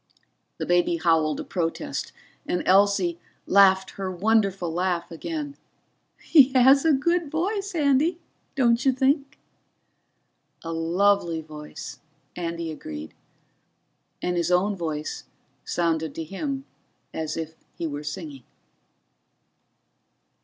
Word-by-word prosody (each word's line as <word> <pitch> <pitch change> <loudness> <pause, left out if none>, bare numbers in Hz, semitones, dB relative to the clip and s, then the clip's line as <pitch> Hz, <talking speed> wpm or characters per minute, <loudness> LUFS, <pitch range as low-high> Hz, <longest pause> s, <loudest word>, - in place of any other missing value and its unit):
The - - -3
baby 175 -1 +2
howled 160 -3 +2
a - - -5
protest, 165 -3 -3 0.4
and 180 - -1
Elsie, 190 -3 +3 0.3
laughed 190 -1 +5
her 195 -1 -4
wonderful 195 -3 +1
laugh 175 -1 -1
again. 290 - -5 0.6
"He 275 -5 +5
has 265 +2 +6
a 320 - +5
good 335 +3 +1
voice, 390 +5 -2
Andy, 295 +2 +2 0.4
don't 240 -2 +3
you 265 - +4
think?" 275 +2 +1 1.3
"A 165 0 -4
lovely 170 +1 +2
voice," 150 -1 -9 0.4
Andy 170 -1 -4
agreed, 80 - -8 1.1
and 180 0 0
his 170 - 0
own 190 +3 +2
voice 155 -4 -4 0.4
sounded 160 -3 -1
to 165 - -4
him 270 - -4 0.5
as 160 0 -3
if 160 -1 -4 0.2
he 170 - -4
were 145 -1 -4
singing. 150 -3 -6
180 Hz, 110 wpm, -25 LUFS, 165-265 Hz, 1.3 s, has